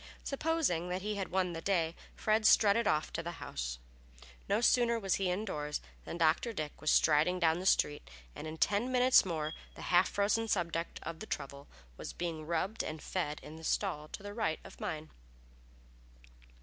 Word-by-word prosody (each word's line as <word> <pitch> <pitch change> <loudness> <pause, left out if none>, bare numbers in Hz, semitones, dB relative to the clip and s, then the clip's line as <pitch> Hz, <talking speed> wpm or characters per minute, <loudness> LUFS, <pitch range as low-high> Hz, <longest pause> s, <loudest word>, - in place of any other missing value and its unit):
Supposing 275 - 0
that 185 +1 -2
he 210 +1 -1
had 195 -3 -3
won 185 -2 0
the 165 - -5
day, 170 -3 +1 0.2
Fred 215 0 +2
strutted 215 +1 +5
off 155 0 +1
to 165 - -2
the 170 +1 -5
house. - - -5 0.7
No 200 +2 +3
sooner 235 0 +4
was 195 -3 +1
he 190 - +2
indoors 180 -6 -2 0.3
than - - -5
Dr. 165 +8 +2
Dick 155 -6 -5
was 155 - 0
striding 155 +4 +4
down 170 0 +2
street, 145 - +2 0.3
and 155 - -6
in 155 +1 -6
ten 210 +9 +1
minutes 255 -2 +6
more 155 -3 -2 0.2
the - - -9
half 175 +2 +6
frozen 215 +3 +1
subject 170 -4 -1
of 165 - -6
the 215 - -7
trouble 140 +1 -5 0.3
was - - -6
being 165 -3 -4
rubbed 185 +6 -1
and 155 0 -5
fed 150 -5 -2
in 155 - -9
the 160 - -11
stall 160 -4 -1
to 195 - -8
the 205 0 -6
right 205 -8 -1
of - - -13
mine. 155 -1 -4
175 Hz, 180 wpm, -33 LUFS, 155-205 Hz, 0.7 s, minutes